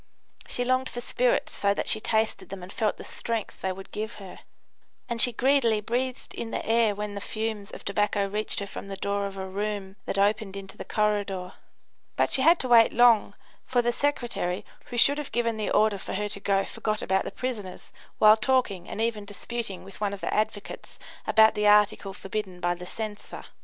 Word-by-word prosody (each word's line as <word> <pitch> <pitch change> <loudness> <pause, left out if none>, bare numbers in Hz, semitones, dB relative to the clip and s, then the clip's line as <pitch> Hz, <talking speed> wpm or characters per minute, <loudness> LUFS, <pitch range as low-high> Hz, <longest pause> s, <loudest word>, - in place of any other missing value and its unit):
She 245 - -2
longed 255 +1 +1
for 240 - -5
spirits - - 0
so 200 0 +1
that - - -2
she 220 - +4
tasted 220 0 0
them 190 -1 -7
and 185 - -9
felt 215 -2 0
the - - -9
strength 230 -2 -4
they 190 - -1
would 190 +1 -9
give 215 +2 -4
her; 195 -3 -10 0.7
and 235 -1 +1
she 245 - +5
greedily 240 -2 +3
breathed 250 +4 -3
in 230 - -5
the - - -3
air 225 -2 +3
when 210 0 -4
the 200 - -5
fumes 215 -1 -3
of - - -10
tobacco 205 0 +1
reached 210 +3 -1
her - - -2
from 200 - -8
the 195 -1 -6
door 200 0 -1
of 195 0 -9
a 190 - -4
room 200 0 -4
that - - -1
opened 200 0 +1
into 195 -1 -9
the - - -7
corridor. 205 -4 -1 0.6
But - - +1
she 265 - +5
had 330 +5 +6
to 255 - 0
wait 235 -2 +6
long, 230 -4 +5 0.3
for 245 -2 +2
the 240 - +2
secretary, 240 -8 -1 0.2
who 245 - -6
should 285 +5 +5
have 295 - -6
given 230 -1 0
the 215 - -2
order 210 -1 +3
for - - -5
her 210 +2 -1
to 200 - -5
go, 195 -1 +1
forgot 215 -1 -3
about 190 0 +1
the - - -4
prisoners 215 -8 -5 0.2
while 215 0 +7
talking 215 -6 0
and - - -6
even 225 -2 0
disputing 205 0 -5
with 195 +2 -13
one 205 -1 0
of 200 - -7
the - - -2
advocates 210 -1 -3 0.3
about 220 0 +6
the 210 0 +1
article 210 -1 +4
forbidden 195 -1 -5
by 175 0 +1
the 180 0 -9
censor. 215 0 -6
210 Hz, 210 wpm, -27 LUFS, 200-230 Hz, 0.7 s, while